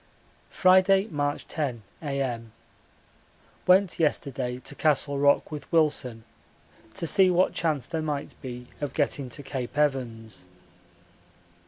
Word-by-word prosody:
Friday, 190 +1 +5
March 145 -1 -2
10, 130 -8 -3 0.2
A.M. 130 -6 -3 1.1
Went 185 0 +4
yesterday 135 -5 0
to 130 - -8
Castle 145 -1 +1
Rock 140 +2 +3
with 150 -1 -7
Wilson 145 -8 +1 0.7
to - - -2
see 190 +2 +5
what 180 +1 +3
chance 155 -6 0
there 165 -1 -3
might 150 -2 -3
be 125 -2 -7 0.2
of 145 - -3
getting 140 -3 0
to 140 - -6
Cape 135 0 -5
Evans. 115 -9 -1
145 Hz, 120 wpm, -27 LUFS, 125-160 Hz, 1.1 s, Friday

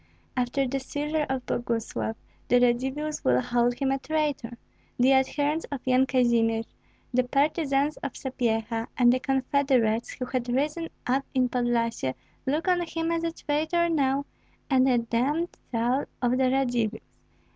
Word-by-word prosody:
After 255 +2 0
the 270 +2 -1
seizure 295 +3 -2
of 265 -2 -2
Boguslav, 230 -2 -2 0.3
the 245 - +5
Radzivills 265 +5 0
will 125 0 +4
hold 240 - +1
him 270 +1 0
a 270 - 0
traitor; 290 -6 -2 0.4
the 255 +2 +5
adherents 290 +4 +1
of 280 - -3
Yan 260 +1 +3
Kazimir, 235 -3 +2 0.5
the 255 +1 +3
partisans 280 +2 +1
of 280 - -5
Sapyeha, 230 -3 -2
and 245 -1 +6
the 255 - +1
confederates 260 -4 +1
who 255 - -4
had 250 -1 -3
risen 300 +6 -1 0.2
up 265 +2 +1
in 255 -1 +3
Podlyasye 235 - 0 0.3
look 305 +6 0
on 360 -1 +3
him 330 -1 -2
as 335 0 0
a 335 - 0
traitor 315 +3 0
now, 280 -3 +1 0.5
and 265 0 +4
a 250 - +4
damned 255 +9 0 0.2
soul 245 +3 +1
of 245 -1 +1
the 255 0 +3
Radzivills. 245 -5 0
260 Hz, 150 wpm, -27 LUFS, 240-290 Hz, 0.5 s, and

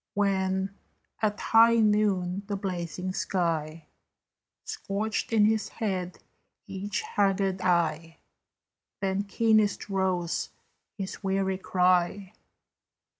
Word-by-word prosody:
When, 190 -1 +1 0.5
at 210 -1 0
high 230 +1 +5
Noon, 205 -4 +2
the 205 - -2
blazing 185 -1 -4
sky 165 -4 -2 0.8
Scorched 210 +3 -3
in 215 -2 +5
his 220 0 +1
head 185 -5 -3 0.5
each 200 +2 -4
haggard 195 -2 0
eye, 165 -2 0 0.8
Then 195 +1 -1
keenest 215 0 +2
rose 185 -3 -1 0.5
his 195 0 -6
weary 190 -1 0
cry. 185 +1 +1
195 Hz, 90 wpm, -28 LUFS, 180-205 Hz, 0.8 s, high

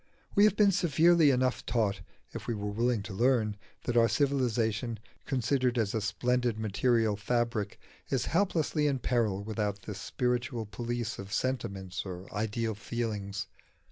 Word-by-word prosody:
We 205 - +6
have 215 - +4
been 205 -2 +5
severely 170 -3 +4
enough 130 -1 +1
taught 105 -5 0 0.3
(if - - -7
we 120 - 0
were 105 0 -3
willing 115 0 +1
to 105 - -7
learn) 115 -1 +2 0.3
that 120 - -2
our 115 -1 +6
civilisation, 120 -5 +1 0.3
considered 125 0 +1
as 110 -4 +1
a 110 - 0
splendid 125 +2 0
material 110 +1 +2
fabric, 115 0 -1 0.3
is 130 -2 0
helplessly 165 -4 +1
in 140 -2 +1
peril 115 -6 0
without 105 -2 -2
the 105 - -5
spiritual 120 +2 -2
police 120 +1 -4
of 100 0 -7
sentiments 100 -8 -2
or 90 -1 -7
ideal 110 +2 -1
feelings. 105 -2 -3
115 Hz, 145 wpm, -30 LUFS, 105-130 Hz, 0.3 s, We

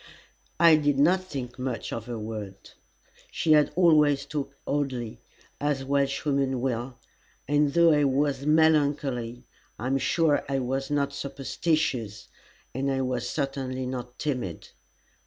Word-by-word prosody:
I 165 -2 +7
did 145 -2 +1
not 175 +7 +4
think 130 -8 -7
much 130 -2 -4
of 115 0 -5
her 120 -1 -4
words. 105 -3 -7 0.6
She 160 - 0
had 150 -1 +5
always 150 -5 +4
talked 140 -1 -5
oddly, 130 -6 -2 0.4
as 145 -2 -1
Welshwomen 140 -1 0
will, 125 0 -3 0.5
and 145 0 +2
though 170 -1 +6
I 150 -1 +3
was 140 0 +1
very 145 +2 0
melancholy 140 -6 +1 0.3
I 115 - -6
am 135 +1 +1
sure 160 0 +2
I 135 - 0
was 135 +2 -2
not 140 -1 0
superstitious, 135 -5 -2 0.4
and 135 +2 -1
I 135 -1 0
was 125 -2 -2
certainly 135 -3 -3
not 125 -1 -6
timid. 125 - -4
135 Hz, 140 wpm, -26 LUFS, 125-145 Hz, 0.6 s, I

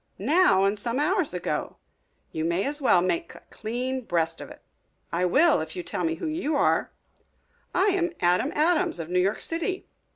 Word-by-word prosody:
"Now 255 - +3
and 200 +1 0
some 235 +4 -2
hours 360 +2 +1
ago. 180 -1 -3 0.5
You 160 - -3
may 170 +4 0
as 290 +1 -2
well 180 -9 +4
make 335 - -2
a - - -14
clean 250 +4 -3
breast 165 -5 -1
of - - -8
it." - - -14 0.5
"I 175 +2 0
will, 300 - +4
If 160 - -7
you 180 - -4
will - - -7
tell 180 - -2
me 165 -1 0
who - - -6
you 310 -1 -1
are." - - +2 0.8
"I 380 - +3
am 355 -3 0
Adam 180 +10 +2
Adams, 315 - +2
of 165 0 -5
New 180 +1 +1
York 195 +3 0
City." 340 +3 -3
240 Hz, 195 wpm, -26 LUFS, -, 0.8 s, well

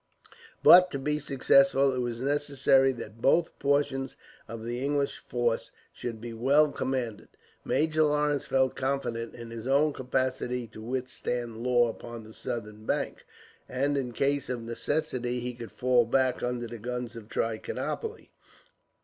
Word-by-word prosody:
But 180 +1 +9
to - - 0
be 150 +2 -1
successful, 135 -1 +4
it 130 - -2
was 120 -2 -2
necessary 140 -1 +3
that 115 -2 -9
both 165 +6 +2
portions 140 -2 0 0.3
of 115 0 -7
the 120 +2 -3
English 140 0 0
force 120 -2 -1 0.2
should 115 -2 -5
be 115 +1 -7
well 140 +6 +4
commanded. 125 -7 -3 0.4
Major 155 0 +1
Lawrence 150 -2 +2
felt 130 -1 +2
confident 130 -4 -2
in 115 -1 -9
his 115 +1 -6
own 145 +3 +3
capacity 125 -1 -1
to 110 - -11
withstand 120 -1 -3
Law 120 -1 +4
upon 115 0 -7
the 110 +1 -13
southern 105 -2 -6
bank, - - -2 0.4
and 140 +3 0
in 130 -3 -1
case 140 +3 0
of 120 -2 -3
necessity 125 0 -2
he 125 +1 -4
could 120 -1 -9
fall 125 -1 +3
back 130 +1 +2
under 120 -1 -2
the 120 0 -8
guns 125 +1 -4
of 110 -2 -10
Trichinopoli. 115 -1 -3
125 Hz, 150 wpm, -28 LUFS, 120-140 Hz, 0.4 s, But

